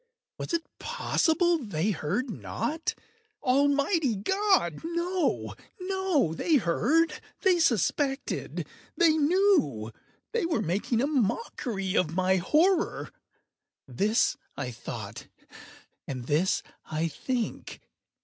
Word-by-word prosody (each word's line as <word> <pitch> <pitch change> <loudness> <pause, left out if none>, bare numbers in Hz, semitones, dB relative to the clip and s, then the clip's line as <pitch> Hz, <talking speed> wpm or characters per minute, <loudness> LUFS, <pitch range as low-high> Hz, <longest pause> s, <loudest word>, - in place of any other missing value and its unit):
Was - - -4
it 335 -1 0 0.2
possible 345 -8 +1
they 205 - -1
heard 195 - -1
not? 315 +8 -3 0.5
Almighty 280 - +2
God!—no, 345 - 0 0.3
no! 370 - +1
They 315 - +1
heard!—they 315 - +1
suspected!—they 285 - 0
knew!—they 315 - +1
were 315 -9 0
making 205 +7 0
a - - +2
mockery 230 - -1
of 165 -2 +1
my 185 +1 +3
horror!—this 225 - 0 0.2
I 130 -3 -3
thought, 120 0 -7 0.8
and 130 -3 -5
this 155 +8 +1 0.2
I 155 +1 -1
think. 240 - -4
270 Hz, 85 wpm, -28 LUFS, -, 0.8 s, my